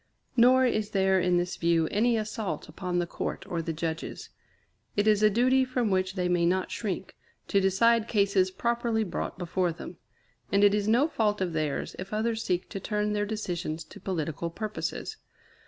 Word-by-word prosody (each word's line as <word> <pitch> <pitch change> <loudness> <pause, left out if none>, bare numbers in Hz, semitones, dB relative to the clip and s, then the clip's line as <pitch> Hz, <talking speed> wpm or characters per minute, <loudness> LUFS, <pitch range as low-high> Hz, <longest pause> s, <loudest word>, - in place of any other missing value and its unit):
Nor 255 +2 +6
is 215 -4 0
there 190 -1 +3
in 180 0 +2
this 175 0 -1
view 165 -1 +2
any 230 +3 +2
assault 215 -6 -3
upon 180 -2 -3
the 175 - +1
Court 185 - -5
or 170 -4 -2
the 165 - -3
Judges. 165 0 -4 0.7
It 205 - +3
is 215 -1 +4
a 215 - +6
duty 255 +5 +3
from 250 -4 -1
which 185 0 0
they 180 -2 0
may 175 -1 +2
not 185 +2 +1
shrink, 190 -4 -4 0.3
to 200 - +3
decide 225 +4 +3
cases 200 -3 +2
properly 235 +3 0
brought 180 - -4
before 180 0 0
them; 165 +1 -9 0.5
and 200 +1 +4
it 205 0 +6
is 205 0 0
no 240 +7 +4
fault 210 -8 0
of 180 -3 -1
theirs 155 -3 -2
if 190 +3 -6
others 225 +1 -1
seek 180 -2 -1
to 195 - -5
turn 210 +1 -1
their 205 0 0
decisions 175 -6 -3
to 155 - -13
political 170 -2 -3
purposes. 215 +5 -4
195 Hz, 185 wpm, -28 LUFS, 175-220 Hz, 0.7 s, Nor